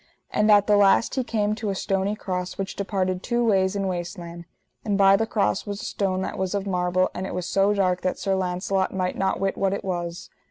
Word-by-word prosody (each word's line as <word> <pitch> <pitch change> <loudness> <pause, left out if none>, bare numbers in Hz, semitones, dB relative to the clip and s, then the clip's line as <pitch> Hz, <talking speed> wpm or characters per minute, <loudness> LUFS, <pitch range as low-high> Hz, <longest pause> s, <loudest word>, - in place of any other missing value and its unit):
And 210 +1 +2
at 205 -1 +6
the 210 0 +4
last 200 +3 +4
he 260 - 0
came 210 -3 0
to 215 -1 -3
a 195 - -1
stony 195 +2 -1
cross 180 -3 -4
which 195 -1 -4
departed 185 -2 -1
two 240 +1 0
ways 190 -3 +2
in 200 -1 -1
waste 175 0 -3
land; 170 0 -9 0.4
and 205 -2 0
by 195 0 +6
the 225 +2 0
cross 105 - 0
was 205 0 -4
a - - -5
stone 190 -2 -1
that 205 - -5
was 190 +1 -1
of 200 -1 -2
marble, 180 -1 +1
but - - -5
it 190 - -4
was 180 -1 -3
so 195 +2 +2
dark 185 -3 +1
that 185 - -1
Sir 195 - -1
Launcelot 190 +1 -1
might 185 -1 -2
not 190 0 0
wit 195 0 0
what 195 0 +1
it 200 - -4
was. 175 -1 -4
195 Hz, 240 wpm, -24 LUFS, 185-205 Hz, 0.4 s, at